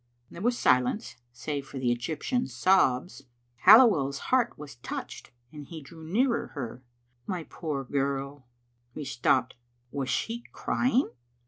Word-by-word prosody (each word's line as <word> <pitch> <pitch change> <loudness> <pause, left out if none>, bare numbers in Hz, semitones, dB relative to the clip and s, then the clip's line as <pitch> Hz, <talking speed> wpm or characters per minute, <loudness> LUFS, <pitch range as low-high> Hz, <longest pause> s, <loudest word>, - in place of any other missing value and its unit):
There 170 - -9
was 240 +3 +1
silence, 125 - +1
save 140 +3 -5
for 135 - -8
the 125 -2 +1
Egyptian's 140 - -2
sobs. 140 -2 +2 0.4
Halliweirs 180 - +7 0.2
heart 245 -2 +3
was 145 -5 -10
touched, 120 - -7 0.2
and 150 -2 -10
he 165 - -8
drew 160 +3 -13
nearer 235 +10 +1
her. 125 -2 -5 0.2
" 120 +1 -43
My 180 -4 -3
poor 150 -5 -4
girl 140 0 -2 0.2
" 120 0 -43
He 150 - -5
stopped. 130 0 +1 0.4
Was 135 -2 -3
she 230 - -2
crying? 255 +2 +1
140 Hz, 140 wpm, -28 LUFS, 130-185 Hz, 0.4 s, Halliweirs